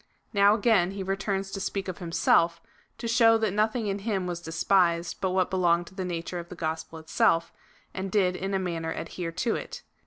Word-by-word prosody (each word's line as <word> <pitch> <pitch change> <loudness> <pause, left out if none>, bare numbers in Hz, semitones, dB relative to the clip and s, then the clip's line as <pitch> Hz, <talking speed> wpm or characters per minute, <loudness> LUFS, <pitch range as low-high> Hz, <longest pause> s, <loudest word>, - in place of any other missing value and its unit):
Now 200 0 +5
again 205 -5 +3
he 195 -1 -4
returns 195 0 -2
to 195 - -4
speak 195 0 -3
of 185 - -4
liimself, 170 0 +3 0.4
to 235 - -5
show 230 -1 +5
that 220 -3 0
no 210 +1 +3
thing 225 0 -4
in 200 0 -2
him 195 -3 -2
was 175 -1 -4
despised 170 +1 +1
but 190 - +1
what 185 0 +1
belonged 175 -2 +2
to - - -20
the 190 -1 -4
nature 175 0 -4
of 170 - -9
the - - -8
gospel 160 0 -4
itself, 165 +1 +1 0.4
and 190 0 -4
did 185 -3 +2
in 195 +2 -2
a - - +3
manner 170 -3 -3
adhere 165 +1 -5
to 205 +7 -1
it. - - -7
185 Hz, 210 wpm, -27 LUFS, 170-200 Hz, 0.4 s, Now